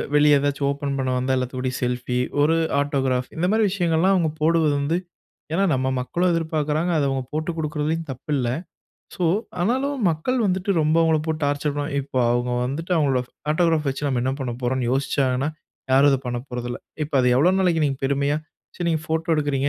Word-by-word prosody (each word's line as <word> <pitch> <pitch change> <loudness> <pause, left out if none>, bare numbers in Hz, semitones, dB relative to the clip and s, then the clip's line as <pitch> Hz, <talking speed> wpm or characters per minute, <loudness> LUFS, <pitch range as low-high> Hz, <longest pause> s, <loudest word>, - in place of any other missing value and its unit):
வெளிய 150 -1 +6
ஏதாச்சும் 140 0 0
ஓப்பன் 140 -1 -3
பண்ண 130 -1 -1
வந்தா 130 +1 +1
எல்லாத்துக்கூடயும் 130 0 -3
செல்ஃபி, 125 0 -1 0.2
ஒரு 155 +3 +4 0.2
ஆட்டோகிராப் 135 -3 0
இந்த 170 - +1
மாரி 220 +1 +3
விஷயங்கள்லாம் 180 0 +2
அவுங்க 165 -4 +1
போடுவது 160 -1 +3
வந்து 155 +4 0 0.6
ஏன்னா 190 +4 +2
நம்ம 130 0 0
மக்களும் 175 +8 0
எதிர்பாக்குறாங்க. 160 0 0
அதை 145 - +2
அவுங்க 135 -1 -1
போட்டு 155 +2 -1
குடுக்குறதிலயும் 155 +1 -2
தப்பு 130 +4 -11
இல்ல. 125 -3 0 0.7
ஸோ, - - -5 0.4
ஆனாலும் 265 +8 0
மக்கள் 165 +12 -1
வந்துட்டு 190 +1 0
ரொம்ப 155 +1 +2
அவுங்கள 160 -1 +3
போட்டு 160 0 -2
டார்ச்சர் 145 +1 0
பண்ணுவாங் 145 +1 -3
இப்போ 135 -1 -4
அவுங்க 120 +1 0
வந்துட்டு, 150 +8 -4
அவுங்களோட 140 -5 +2 0.3
ஆட்டோகிராப் 160 -2 +2
வச்சு 135 +1 -3
நம்ம 130 -3 0
என்ன 130 +1 0
பண்ண 125 -2 -2
போறோம்ன்னு 125 0 0
யோசிச்சாங்கன்னா, 135 0 0 0.4
யாரும் 140 +2 +6
அத 135 - +2
பண்ண 120 0 -2
போறதில்ல. 120 0 -4 0.3
இப்ப 150 - -8
அது 125 - +3
எவ்ளோ 170 +7 +4
நாளைக்கு 170 -4 +2
நீங்க 135 -1 -2
பெருமையா 140 +2 +1 0.4
சரி 175 - -2
நீங்க 160 -2 0
ஃபோட்டோ 160 +2 -1
எடுக்குறீங்க. 145 -2 0
145 Hz, 180 wpm, -23 LUFS, 130-160 Hz, 0.7 s, வெளிய